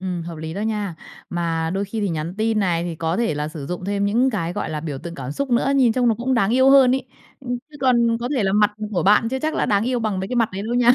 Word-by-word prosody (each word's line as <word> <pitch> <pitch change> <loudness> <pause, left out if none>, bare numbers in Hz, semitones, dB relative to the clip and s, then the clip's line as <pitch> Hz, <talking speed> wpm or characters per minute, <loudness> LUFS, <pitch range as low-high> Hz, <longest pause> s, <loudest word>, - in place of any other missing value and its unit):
Ừm, 180 -2 -3
hợp 165 0 -7
lý 160 +1 -6
đó 200 - -4
nha. 210 -4 -2 0.4
Mà 165 -2 -1
đôi 200 +1 -1
khi 215 +3 -4
thì 205 - 0
nhắn 165 +1 -3
tin 220 0 +1
này 175 -4 +1
thì 175 - -4
có 165 +1 -1
thể 230 -9 0
là 150 +1 -2
sử 155 -3 -7
dụng 180 +3 -5
thêm 200 0 -1
những 240 +6 +2
cái, 175 -7 -2
gọi - - -3
là, 155 - -3
biểu 150 -4 -5
tượng 170 +3 -8
cảm 135 -1 -5
xúc 280 - -3
nữa, 245 +3 +2
nhìn 245 -4 +4
trông 245 0 +2
nó 225 - +3
cũng 255 +4 -1
đáng 215 -3 +2
yêu 260 +3 +5
hơn 265 -2 +6
ấy. 265 0 -3 0.3
Ừ, 260 - -15 0.2
chứ 295 - -12
còn 235 -3 +3
có 245 - -2
thể 235 - +1
là 190 - +1
mặt 210 +1 +4 0.2
của 175 - 0
bạn 210 +5 +4
chưa 265 +1 -2
chắc 310 +3 -2
đã - - 0
đáng 205 +1 +2
yêu 250 -1 0
bằng 215 -4 -1
mấy 190 - -4
cái 250 - -2
mặt 230 -2 +3
đấy 195 +2 -4
luôn 240 +3 -1
nha. 245 0 +6
205 Hz, 315 wpm, -22 LUFS, 170-240 Hz, 0.4 s, hơn